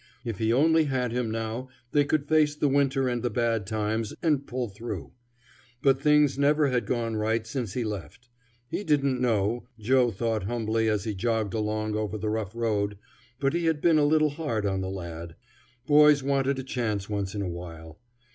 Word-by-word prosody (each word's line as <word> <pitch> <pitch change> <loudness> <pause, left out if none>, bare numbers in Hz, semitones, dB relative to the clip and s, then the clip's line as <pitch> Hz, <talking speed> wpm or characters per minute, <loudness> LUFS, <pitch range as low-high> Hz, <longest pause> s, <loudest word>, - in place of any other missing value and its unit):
If 115 -5 -4
he 110 0 +1
only 160 +5 +4
had 130 -4 -1
him 120 -1 -1
now, 115 +3 -4 0.2
they 145 0 +4
could 145 0 0
face 155 -1 +3
the 150 - +1
winter 135 -1 +2
and 120 -1 -1
the 120 - 0
bad 115 -2 0
times, 110 0 -2
and 150 -4 +1
pull 125 -1 -2
through. 110 +4 -7 0.7
But 135 -2 +3
things 150 -2 +4
never 145 0 +3
had 125 -2 0
gone 115 -3 -1
right 110 +1 0
since 115 -4 -4
he 125 - -1
left. 105 +3 -6 0.4
He 200 - -3
didn't 140 -6 +1
know, 115 0 0
Joe 125 +3 +3
thought 110 -1 -2
humbly 110 0 0
as 105 -3 0
he 110 - -3
jogged 110 0 -1
along 110 -1 -1
over 110 0 -2
the 105 +1 -2
rough 110 -1 -3
road, 105 -3 -1 0.4
but 135 +1 +1
he 170 0 0
had 160 -2 +1
been 160 -1 +4
a - - +3
little 155 0 +3
hard 140 -9 -2
on 95 -1 0
the 95 - -3
lad. 85 -3 -7 0.5
Boys 150 -1 +6
wanted 135 0 +1
a 130 - -4
chance 110 -6 -2
once 100 -1 -3
in 100 - -2
a - - -2
while. 80 -1 -8
115 Hz, 195 wpm, -27 LUFS, 105-140 Hz, 0.7 s, Boys